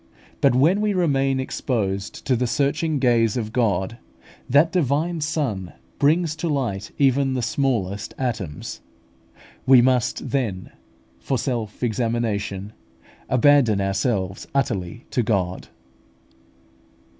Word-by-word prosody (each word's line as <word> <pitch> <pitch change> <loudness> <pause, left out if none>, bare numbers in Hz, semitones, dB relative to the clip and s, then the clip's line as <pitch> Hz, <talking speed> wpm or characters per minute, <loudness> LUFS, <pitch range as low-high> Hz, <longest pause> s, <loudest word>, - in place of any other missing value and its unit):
But - - +4
when 165 +11 +4
we 210 -2 +1
remain 135 -6 +1
exposed 105 -7 -3
to 130 - +2
the 125 +1 0
searching 150 +4 0
gaze 120 -4 +2
of 110 -2 -4
God, 105 -2 0 0.5
that 145 +6 +4
Divine 160 +1 0
Sun 135 - -2 0.3
brings 155 +2 +2
to 170 - -2
light 115 -9 -2
even 135 -1 +2
the 125 - -1
smallest 110 -6 -1
atoms. 110 - -4 0.9
We 130 -1 +8
must 125 -1 +1
then, 110 -10 -2 0.5
for 130 - -1
self 115 -3 -3
examination, 110 -4 -2 0.6
abandon 130 -4 +4
ourselves 95 -1 -1
utterly 115 -5 -2
to 125 - +1
God. 95 -5 -1
125 Hz, 110 wpm, -23 LUFS, 105-140 Hz, 0.9 s, We